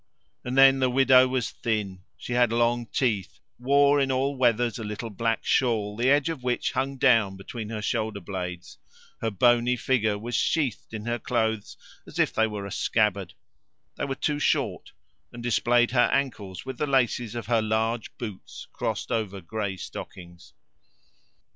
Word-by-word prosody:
And 125 +2 -3
then 135 0 +7
the 130 -1 +2
widow 130 0 +5
was 130 -2 -2
thin; 105 -5 -3 0.2
she 120 - -6
had 120 -2 +3
long 120 0 +1
teeth; 110 -9 -1 0.2
wore 140 +3 +4
in 135 -1 +1
all 135 +2 0
weathers 120 -3 +1
a - - -5
little 105 +2 -5
black 115 +3 -1
shawl, 110 -5 +1
the 120 +4 +1
edge 145 +1 +3
of 165 -5 -3
which 125 -1 -1
hung 135 +1 -2
down 115 -7 +3
between 105 +3 -7
her 110 -2 -5
shoulder 110 -2 -1
blades; 90 -1 -6 0.4
her 115 - 0
bony 120 +4 +3
figure 110 -4 0
was 120 +4 -7
sheathed 130 - 0
in 110 -1 -6
her 120 0 -1
clothes 110 -3 -2 0.3
as - - -10
if - - +2
they 110 0 +2
were 105 -2 -5
a 100 - -7
scabbard; 100 -5 0 0.6
they - - -3
were 135 -1 -3
too 145 +2 -1
short, - - 0 0.4
and 120 0 -9
displayed 120 +1 +2
her 120 -1 +3
ankles 110 -9 -2
with 130 - -7
the 150 - 0
laces 120 -4 +1
of 120 - -4
her 115 -1 +2
large 110 +1 -1
boots 105 -5 -8
crossed - - -3
over 105 -4 -2
grey 95 +2 -4
stockings. 85 -1 -10
115 Hz, 170 wpm, -26 LUFS, 105-130 Hz, 0.6 s, then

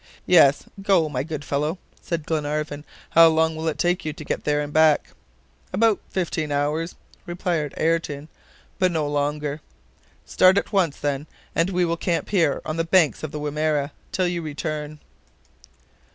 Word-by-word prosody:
"Yes, 155 -6 +5 0.2
go, 190 -5 +3
my 130 -3 -2
good 150 0 -5
fellow," 150 +6 -1 0.2
said 165 -3 -3
Glenarvan. 150 -1 -2 0.3
"How 165 0 +8
long 160 0 +2
will 160 +1 -4
it 160 - -1
take 175 0 +1
you 155 - -3
to 150 - -10
get - - -3
there 150 0 +2
and 145 0 -4
back?" 155 -1 +4 0.6
"About 215 +2 +3
fifteen 165 -4 -2
hours," 150 +4 -1 0.3
replied 175 -4 -2
Ayrton, 155 -3 -1 0.5
"but 185 -2 +3
not 160 -3 0
longer." 145 +1 -2 0.6
"Start 185 +1 +4
at 210 - -1
once, 180 -7 +2
then, 145 +1 -2 0.3
and 165 +3 +1
we 180 -2 +1
will 170 0 -1
camp 170 0 -1
here, 170 -8 +1
on 155 - -3
the 165 - +1
banks 165 -2 +3
of 155 - -5
the 150 - -5
Wimerra, 150 0 -1 0.2
till 185 -1 +1
you 175 -1 -2
return." 155 -1 -5
155 Hz, 165 wpm, -23 LUFS, 150-170 Hz, 0.6 s, How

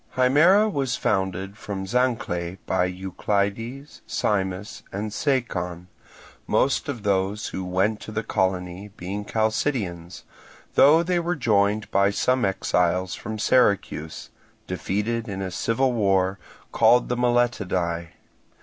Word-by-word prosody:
Himera 155 - +5
was 135 -3 0
founded 95 0 -1
from 95 -2 -5
Zancle 95 -7 -1
by 95 -1 +1
Euclides, 100 +8 -3
Simus, 95 0 -2
and 105 +2 -4
Sacon, 90 - -2 0.6
most 140 - +1
of 125 -7 -4
those 100 +1 0
who 95 - -5
went 95 +4 0
to - - -9
the 110 +1 -2
colony 95 0 -1
being 100 +4 -4
Chalcidians; 105 - -2 0.5
though 155 +4 +6
they 175 0 +1
were 175 +1 -1
joined 105 -5 +1
by 100 +1 +4
some 125 +5 +1
exiles 90 -2 0
from 110 +1 -6
Syracuse, 100 -8 +1 0.3
defeated 115 +4 -2
in 95 -1 -4
a 95 - -4
civil 120 +8 0
war, 95 -3 +1 0.3
called 125 +1 +4
the 125 - -1
Myletidae. 105 -9 0
100 Hz, 120 wpm, -24 LUFS, 95-120 Hz, 0.6 s, though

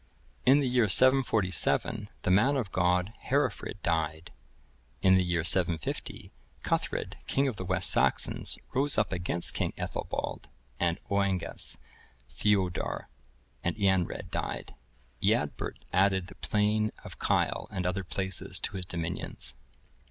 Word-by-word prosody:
In 140 +3 +6
the 135 - 0
year 125 -4 +2
747, 110 - +3
the - - +1
man 125 +10 +4
of 115 -8 -3
God, 90 +3 +1
Herefrid,(1072) 130 -7 -1
died. 80 -1 -1 0.7
In 95 - +6
the 95 - +4
year 85 -2 0
750, 85 -3 0 0.3
Cuthred, - - -2
king 140 +1 +1
of 125 -6 -3
the 95 - -4
West 95 0 +1
Saxons, - - +1 0.2
rose 140 +2 +3
up 105 - +1
against 85 -1 +1
king - - -2
Ethelbald - - -4 0.3
and 85 0 +1
Oengus; 100 -2 0 0.5
Theudor 95 -4 0 0.5
and 85 - -1
Eanred 95 -4 0
died; 60 -1 -4 0.5
Eadbert - - 0 0.2
added 95 0 +3
the - - -11
plain 105 +1 +1
of - - -11
Kyle - - 0
and 95 -4 -4
other 95 +2 -1
places 95 +1 -1
to 95 - -2
his 90 - -5
dominions. 80 -8 -3
95 Hz, 130 wpm, -29 LUFS, 90-105 Hz, 0.7 s, In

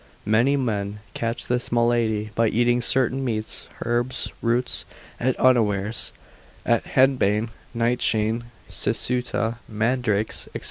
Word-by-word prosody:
Many 120 +7 +3
men 105 -5 -2
catch 115 0 -2
this 125 0 0
malady 115 -3 +1
by 115 +2 +2
eating 120 +2 +2
certain 130 +2 +1
meats, 110 -4 -3 0.2
herbs, 120 +2 0
roots, 120 +2 0 0.4
at 130 +1 0
unawares; 110 -4 +2 0.5
as - - +3
henbane, 120 -5 +2 0.3
nightshade, 115 -1 +1 0.3
cicuta, 120 -2 -1
mandrakes, 110 -1 0
&c. - - -2
115 Hz, 105 wpm, -24 LUFS, 110-125 Hz, 0.5 s, Many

